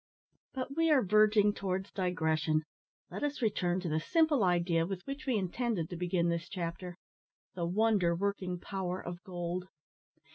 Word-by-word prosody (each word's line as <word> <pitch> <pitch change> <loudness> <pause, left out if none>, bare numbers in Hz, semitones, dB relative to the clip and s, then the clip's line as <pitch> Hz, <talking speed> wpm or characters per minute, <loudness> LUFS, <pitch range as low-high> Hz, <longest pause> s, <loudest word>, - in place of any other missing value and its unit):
But 265 +1 -4
we 330 0 +3
are 290 -4 +5
verging 210 +1 +4
towards 190 -1 -3
digression. 160 -4 0 0.5
Let - - -5
us 290 0 -1
return 185 -4 +1
to 180 - -4
the 155 0 +1
simple 315 - +3
idea 175 -2 +2
with 190 -2 -5
which 275 +2 -6
we 250 -4 +2
intended 195 -2 -1
to - - -3
begin 175 0 0
this 170 +1 -2
chapter 175 -1 -4 0.6
the 170 -2 -2
wonder 195 -2 +2
working 185 -1 -2
power 185 -1 -3
of 175 +1 -7
gold. 180 0 -4
185 Hz, 155 wpm, -32 LUFS, 175-215 Hz, 0.6 s, are